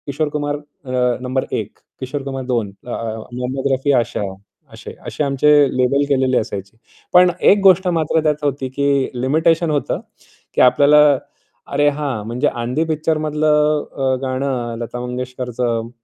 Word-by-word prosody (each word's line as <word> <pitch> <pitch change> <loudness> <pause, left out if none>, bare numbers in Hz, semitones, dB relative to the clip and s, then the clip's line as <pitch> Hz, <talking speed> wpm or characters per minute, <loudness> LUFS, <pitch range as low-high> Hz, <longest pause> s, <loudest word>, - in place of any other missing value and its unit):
किशोर 145 +2 -1
कुमार 145 0 -2
अ, 145 - -8 0.6
number 130 +1 -1
1, - - -4 0.2
Kishore 135 +2 -4
Kumar 135 -1 -5
2 120 -5 -1 0.2
अ, - - -5 0.4
मोहम्मद 130 +2 -2
रफी 135 +2 +1
आशा 120 -1 -4 0.5
अशे - - -9 0.2
अशे - - -2
आमचे 140 +1 +2 0.3
लेबल 130 +3 +2
केलेले 130 -2 +2
असायचे. 100 0 -4 0.4
पण 180 0 +7 0.2
एक 205 - +4
गोष्ट 190 -1 +5
मात्र 160 0 +1
त्यात 150 -1 0
होती 135 -2 -1
की 140 - 0 0.4
लिमिटेशन 160 +5 +2
होतं 145 -2 -1 0.5
की - - +2
आपल्याला 145 +4 +6 0.7
अरे, 145 +1 +2
हां 140 -7 -3
म्हणजे 125 +5 0
आंधी 125 +6 -1
पिक्चरमधलं 155 -1 +1
अ, 135 -1 +1
गाणं 130 -3 -2
लता 120 +1 -5
मंगेशकरचं 125 -2 -3
135 Hz, 140 wpm, -19 LUFS, 125-150 Hz, 0.7 s, पण